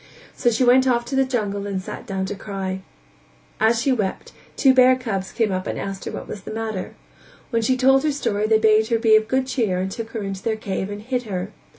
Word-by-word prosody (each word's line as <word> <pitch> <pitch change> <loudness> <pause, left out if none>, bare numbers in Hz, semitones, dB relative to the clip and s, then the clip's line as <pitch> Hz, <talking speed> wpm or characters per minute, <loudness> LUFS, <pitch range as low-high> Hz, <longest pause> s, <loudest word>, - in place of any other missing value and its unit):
So 240 - +2
she 235 +2 +1
went 255 +1 +5
off 240 -2 +2
to 265 - -4
the 270 0 +3
jungle 205 -6 -2
and 195 -2 -2
sat 185 - -8
down 190 -1 -2
to 190 - -4
cry; 195 -2 -5 0.8
as 225 +1 +3
she 270 +4 +1
wept 210 -7 -2 0.3
two 265 -2 +5
bear 255 0 +6
cubs 200 -7 -4
came 225 -3 0
up 185 0 -2
and - - -3
asked 195 -1 -5
what - - -6
was 200 - -7
the - - -10
matter; 220 -3 -4 0.6
when 230 -1 +1
she 255 +3 +1
told 270 +1 +5
her 305 +1 +1
story 215 -7 -1
they 220 0 +5
bade 220 0 +4
her 230 -1 +2
be 225 -1 +5
of 215 0 +3
good 260 +2 +1
cheer 225 -8 0
and 190 +1 -2
took 225 +2 -5
her 225 -2 -5
into 195 -1 -5
their 225 +1 -1
cave 195 -2 -4
and 205 +1 -7
hid 250 +1 -2
her. 185 +1 -3
220 Hz, 240 wpm, -22 LUFS, 195-250 Hz, 0.8 s, bear